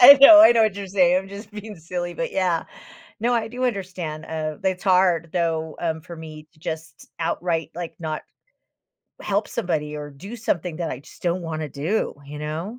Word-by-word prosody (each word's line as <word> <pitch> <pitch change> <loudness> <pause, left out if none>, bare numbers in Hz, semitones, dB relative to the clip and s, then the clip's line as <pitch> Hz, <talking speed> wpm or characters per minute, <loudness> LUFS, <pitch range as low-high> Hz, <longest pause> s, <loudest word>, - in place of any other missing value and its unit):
I 275 +3 +12
know, 310 +3 +11
I 320 - +9
know 230 -1 +4
what 215 -3 +2
you're 200 -1 -5
saying, 185 -2 +4
I'm 190 +1 -7
just 205 +2 -9
being 210 0 -8
silly, 175 +1 -4
but 250 - -3
yeah. 180 -3 +1 0.6
No, 240 +2 +2
I 225 -2 0
do 250 +3 -3
understand, 180 -8 -3
uh, 155 -1 -3
it's 190 -1 0
hard, 180 -4 +3
though, 160 -2 -1
um, 160 -2 -2
for 170 +1 -10
me 155 -1 -10
to - - -25
just 160 0 -7
outright, 165 -1 -1
like, 175 -1 -5
not 155 -2 -4 1.0
help 205 +1 0
somebody 150 -3 -2
or 145 0 -6
do 195 +12 -9
something 180 -7 -2
that 170 -1 -3
I 130 - -5
just - - -17
don't 175 +1 0
wanna 155 -2 -4
do, 155 +11 -1
you 145 +1 -8
know? 160 +10 -4
175 Hz, 195 wpm, -23 LUFS, 160-200 Hz, 1.0 s, I